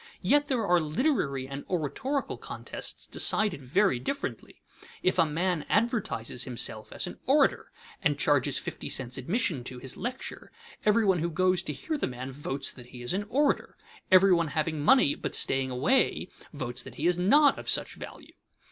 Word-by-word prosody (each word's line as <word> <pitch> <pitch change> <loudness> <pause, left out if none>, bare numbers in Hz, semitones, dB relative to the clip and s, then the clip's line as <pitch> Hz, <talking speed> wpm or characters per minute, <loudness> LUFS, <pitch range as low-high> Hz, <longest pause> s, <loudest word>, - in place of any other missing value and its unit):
Yet 290 0 +3
there 245 -5 0
are 180 -2 +4
literary 155 - 0
and 140 +1 -6
oratorical 190 - -2
contests - - -5
decided 210 -9 +1
very 150 +2 +2
differently. 275 - -5 0.4
If 185 0 +2
a 165 - +5
man 170 +1 -1
advertises 210 - 0
himself 125 -3 -2
as - - -2
an - - -8
orator - - +3 0.3
and - - +1
charges - - +2
fifty - - -5
cents 130 0 -1
admission 165 - -1
to 125 - -6
his 130 +1 -4
lecture, 255 +2 -6 0.3
everyone 210 -4 +4
who 170 +2 -1
goes 185 +1 +2
to 155 -5 -5
hear 305 - -4
the - - 0
man 130 +1 -6
votes 135 0 -3
that 125 -2 -13
he 125 0 -10
is 120 - -1
an 205 +2 -2
orator; 285 +4 +1 0.3
everyone 185 -3 +5
having 155 +1 -1
money 155 - +5
but - - -3
staying 135 0 +2
away 145 - +1 0.2
votes 130 -4 -4
that - - -11
he 150 - -3
is 175 0 +2
not 280 +11 +5
of - - -5
such - - +1
value. - - -11
170 Hz, 170 wpm, -28 LUFS, 135-210 Hz, 0.4 s, a